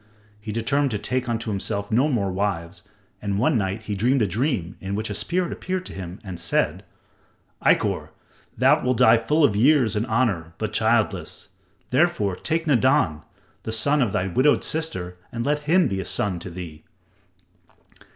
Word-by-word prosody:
He 105 +1 -6
determined 135 +6 +1
to 110 - -2
take 125 +3 -2
unto 115 -1 -2
himself 100 0 -2
no 130 +7 +3
more 100 -8 0
wives, 90 -2 -3 0.4
and 100 -1 -2
one 125 +7 +2
night 100 0 -1
he 105 - -4
dreamed 120 +5 +2
a - - +3
dream 100 - -1
in 95 +1 -3
which 110 +1 -3
a - - -2
spirit 175 - -1
appeared 185 0 -4
to - - -9
him 90 -1 -7
and 95 -4 -7
said: 85 0 0 0.8
"Ikkor, - - +2 0.5
thou - - +4
wilt 125 -1 +1
die 115 +1 +6
full 150 +8 +1
of 105 -8 +4
years 125 -1 +4
and 110 +3 -1
honor, 105 -9 0
but - - -3
childless. - - 0 0.4
Therefore, 130 - +2
take 160 - -2
Nadan, 130 - +2 0.4
the 110 - -5
son 140 +6 +2
of 120 -6 +1
thy 90 - 0
widowed 130 +11 +2
sister 155 - -2
and 115 0 -3
let 150 +1 +1
him 180 +2 +5
be 95 -1 -2
a - - -7
son 95 -4 -1
to 90 - -7
thee." 85 -3 -9
110 Hz, 175 wpm, -23 LUFS, 95-135 Hz, 0.8 s, die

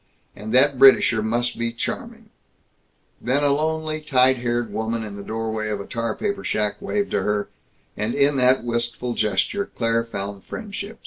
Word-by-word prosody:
And 110 +1 -7
that 130 +2 +4
Britisher 130 -4 +6
must 120 +3 -1
be 115 0 -1
charming 115 - -6 0.9
Then 135 +4 +1
a 145 - +4
lonely, 155 +1 -1
tight 130 -3 +3
haired 120 -1 -2
woman 110 +1 -2
in 105 -2 -7
the 100 - -7
doorway 110 0 -3
of 105 -1 -2
a 100 - -6
tar 115 -1 -3
paper 200 -2 -3
shack 105 -1 -1
waved 205 -1 -1
to 100 - +1
her, 105 +1 -1 0.5
and 105 +2 -2
in 140 +1 +3
that 130 -1 +4
wistful 120 +1 -2
gesture 110 - 0
Claire 115 0 +1
found 100 -3 -6
friendship. 210 0 -7
120 Hz, 170 wpm, -23 LUFS, 110-140 Hz, 0.9 s, Britisher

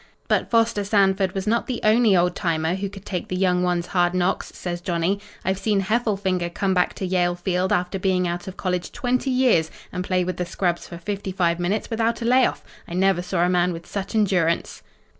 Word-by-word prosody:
"But - - +1
Foster 230 -3 +2
Sanford 195 -2 +2
was 195 0 -2
not 230 +2 +1
the 250 - -2
only 215 -2 +5
old 175 0 +2
timer 165 -2 0
who 195 +1 -3
could 195 0 -12
take 180 -3 -4
the 185 - -3
young 180 -1 +2
ones' 175 -1 0
hard 175 -1 +1
knocks," 180 +1 0
says 175 -1 -4
Johnny. 175 +3 0 0.3
"I've 190 0 0
seen 205 -1 +1
Heffelfinger 195 -4 0
come 190 +2 -1
back 180 -1 +1
to 190 - -4
Yale 180 -1 +1
Field 180 +1 -1
after 180 +2 0
being 185 -1 +1
out 175 +1 -4
of 190 - -7
college 180 -2 -2
twenty 255 +2 -1
years 250 -11 +3 0.2
and 180 - -3
play 185 -1 +1
with 185 +1 -3
the 180 - -1
scrubs 175 -1 -1
for 170 - -8
fifty 195 +2 -4
five 175 -2 +1
minutes 195 +7 -1
without 230 +1 0
a - - -2
layoff! 255 +2 +3 0.2
I 170 - -6
never 190 -1 +2
saw 175 -1 0
a - - +2
man 180 0 +2
with 165 0 -8
such 200 +2 -5
endurance. 180 -6 +1
185 Hz, 215 wpm, -23 LUFS, 175-200 Hz, 0.3 s, only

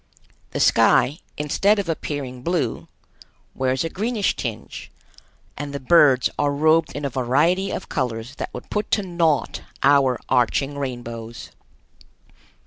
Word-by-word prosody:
The - - -4
sky, 145 +6 +4 0.2
instead 195 +8 +2
of 200 -3 -2
appearing 145 -6 -4
blue, 150 -6 -2 0.7
wears 130 +1 0
a 165 - -2
greenish 215 0 -1
tinge, 115 -3 -6 0.7
and 145 0 -6
the - - -3
birds 135 -2 +5
are 145 -1 +2
robed 155 +3 +2
in 145 - -4
a - - 0
variety 150 +10 +1
of 185 - -5
colors 120 -1 -3
that - - -5
would - - -10
put 210 0 -2
to 205 - -3
naught 170 -5 0 0.2
our 135 -3 +4
arching 130 +3 +1
rainbows. 120 -3 -6
140 Hz, 135 wpm, -22 LUFS, 125-165 Hz, 0.7 s, birds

